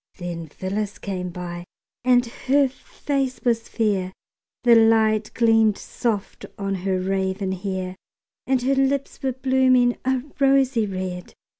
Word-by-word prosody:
Then 170 -2 -5
Phyllis 200 +6 -4
came 185 -3 -4
by, 175 0 -6 0.4
and 250 0 +4
her 270 +4 +1
face 270 0 -3
was 230 -2 0
fair, 195 -5 0 0.5
The 240 -1 +6
light 220 -1 +4
gleamed 225 -2 +4
soft 220 -5 -3
on 195 -1 -2
her 190 0 -1
raven 190 +1 -1
hair; 190 -1 -4 0.5
And 260 -2 +1
her 270 +2 +2
lips 270 +1 0
were 265 -1 -1
blooming 255 -1 +3
a 260 -1 0 0.2
rosy 270 -5 +3
red. 185 -2 -5
220 Hz, 130 wpm, -23 LUFS, 190-255 Hz, 0.5 s, The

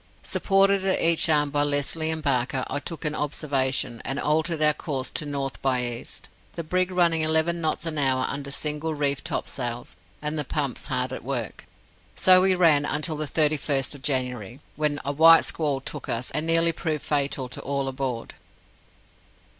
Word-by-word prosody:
Supported 195 0 +2
at 190 -1 +1
each 165 +1 +4
arm 150 -2 +3
by 145 0 +1
Lesly 145 +2 +1
and 160 -1 -4
Barker, 130 -1 0
I - - -2
took 165 +1 -7
an 150 - 0
observation, 135 -5 -1
and 135 +1 -2
altered 160 +2 0
our 150 0 +4
course 135 -4 -4
to 150 - -2
north 140 -2 -4
by 130 -2 +1
east, 120 -1 -5 0.3
the 170 - -4
brig 180 +3 0
running 170 -3 +2
eleven 160 +2 +1
knots 160 +1 -1
an 155 -2 -2
hour 130 -2 +2
under 140 0 -5
single 150 +2 -2
reefed 140 -2 -1
topsails, 120 -2 -4 0.2
and 150 +1 -3
the - - +1
pumps 140 -2 -3
hard - - -2
at - - -7
work. - - -5 0.5
So 185 0 +6
we 190 0 +3
ran 160 -5 +4
until 150 +2 -1
the 150 0 -3
31st 145 -3 +2
of 140 - -12
January, 125 -4 -2 0.2
when 150 -1 0
a 140 - 0
white 165 +3 +7
squall 145 -4 -1
took 135 - -7
us, 120 +2 -2
and 155 +1 -1
nearly 165 0 +4
proved 155 -2 -3
fatal 140 -3 -1
to - - -7
all 140 0 -2
aboard. 130 -3 -4
150 Hz, 180 wpm, -25 LUFS, 135-160 Hz, 0.5 s, white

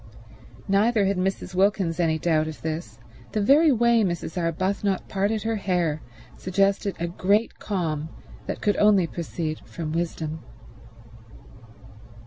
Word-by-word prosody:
Neither 205 +2 +3
had 195 0 +1
Mrs. 185 0 -2
Wilkins 190 -3 +1
any 160 -2 +2
doubt 155 -1 +1
of 155 - -8
this; 160 +2 -4 0.4
the 215 - +1
very 285 +9 +5
way 235 -1 +4
Mrs. 170 -4 -3
Arbuthnot 185 +3 -1
parted 205 +2 -1
her 225 0 -1
hair 175 -6 0 0.4
suggested 195 +1 +1
a 170 - -1
great 200 +6 0
calm 160 -6 -2 0.4
that - - -4
could 205 - +1
only 205 -4 +5
proceed 165 -1 -4
from 160 -3 -6
wisdom. 160 -1 -3
185 Hz, 125 wpm, -25 LUFS, 165-205 Hz, 0.4 s, very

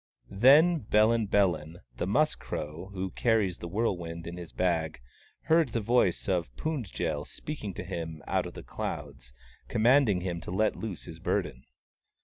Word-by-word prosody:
Then 145 - +6
Bellin 110 -1 +3
Bellin, 85 -5 +1 0.2
the 90 - -2
Musk 150 +10 +2
Crow, 80 +5 -5
who 95 -1 -4
carries 110 -7 +1
the 85 - -6
whirlwind 85 -4 -2
in 85 - -6
his 85 -2 -8
bag, 80 -6 0 0.4
heard 160 -3 +3
the 115 - -1
voice 110 -4 +2
of 90 -6 0
Pund 135 - -3
jel - - -2
speaking 125 - -6
to - - -5
him 80 -4 -5
out 95 -2 0
of 90 - -10
the - - -8
clouds, 70 -5 -6 0.4
commanding 115 -4 +4
him 85 -2 -3
to - - -8
let 105 +4 +1
loose 105 -7 -6
his - - -10
burden. - - -2
95 Hz, 160 wpm, -29 LUFS, 85-115 Hz, 0.4 s, Then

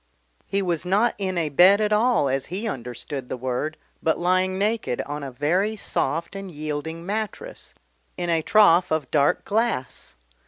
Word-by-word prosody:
He 200 0 0
was 170 -4 -1
not 205 +6 +2
in 190 -2 -2
a 160 -3 0
bed 180 +8 +6
at 210 0 +1
all 225 - +3
as 135 0 -1
he 200 +6 -4
understood 125 - -6
the - - -3
word, 130 +5 -3 0.2
but 160 - +1
lying 185 +1 +1
naked 210 - -1
on 145 +1 -5
a 140 - -5
very 175 - 0
soft 165 -3 -2
and 195 -1 -6
yielding 155 +1 -5
mattress, 210 +1 -5 0.4
in 175 - -2
a 165 -1 +2
trough 185 -2 +5
of 155 -4 -1
dark 145 -2 +2
glass. 220 - -1
175 Hz, 165 wpm, -24 LUFS, 145-200 Hz, 0.4 s, bed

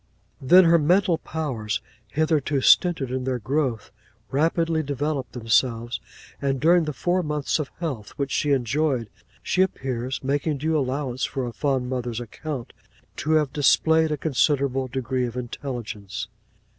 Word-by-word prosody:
'Then 180 +8 +7
her 170 0 +5
mental 175 +2 +3
powers, 115 -10 -3 0.3
hitherto 155 +2 +1
stinted 145 -2 +4
in 130 0 -2
their 130 -1 -1
growth, 125 -1 -1 0.4
rapidly 165 +2 +1
developed 145 -1 -3
themselves; 115 -1 +1 0.4
and 135 -2 0
during 170 +4 +4
the 150 - -2
four 175 +5 0
months 150 -2 -1
of 150 - -3
health 135 - -4
which 140 -1 -2
she 145 - 0
enjoyed, 130 -2 0 0.3
she 185 - +1
appears 130 -8 -2
(making 145 +2 0
due 160 +3 0
allowance 130 -2 -1
for 135 -2 -2
a 120 - -5
fond 130 0 0
mother's 125 -2 -3
account) 125 +2 -6 0.4
to 155 +3 -1
have 150 -4 +2
displayed 160 +2 +3
a 150 - 0
considerable 135 -2 +1
degree 130 0 -2
of 120 +1 -7
intelligence. 120 -6 -5
135 Hz, 145 wpm, -24 LUFS, 125-155 Hz, 0.4 s, Then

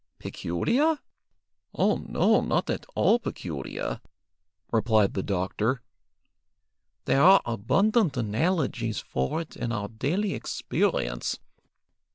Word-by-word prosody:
"Peculiar? 270 - 0 0.8
Oh - - +2
no, - - +2
not - - 0
at - - -4
all 235 - +4
peculiar," 75 - -5 0.7
replied 110 -3 +3
the 95 - -1
doctor. 105 +6 -1 1.2
"There 135 - +3
are 190 +4 +7
abundant 180 - +2
analogies 120 - 0
for 65 - -2
it 160 - -10
in 120 - -3
our 105 -3 -3
daily 175 - -1
experience. - - -1
120 Hz, 100 wpm, -27 LUFS, -, 1.2 s, are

